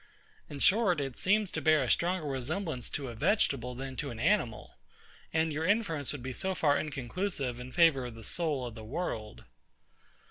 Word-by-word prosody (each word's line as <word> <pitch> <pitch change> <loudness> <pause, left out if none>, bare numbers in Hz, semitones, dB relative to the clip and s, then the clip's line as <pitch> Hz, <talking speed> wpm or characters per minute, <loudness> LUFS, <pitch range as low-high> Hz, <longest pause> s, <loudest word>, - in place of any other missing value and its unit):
In 145 - -6
short, 185 +1 +4
it 135 -3 -3
seems 205 0 +2
to - - -2
bear 155 -1 +4
a - - -2
stronger 175 -1 +1
resemblance 140 - -3
to 140 -3 -4
a - - -6
vegetable 125 - +1
than 135 +1 -6
to 145 - -3
an 115 - -7
animal, 155 - +1 0.6
and 160 -1 +1
your 155 +2 -2
inference 180 - +1
would 145 -4 -6
be 130 0 -4
so 190 +7 -2
far 145 -4 +3
inconclusive 140 -2 -3
in 125 +1 -8
favour 160 -7 +4
of 120 - -9
the 115 - -11
soul 150 0 -1
of 120 - -6
the 110 -1 -9
world. 110 -4 -4
145 Hz, 185 wpm, -31 LUFS, 125-175 Hz, 0.6 s, short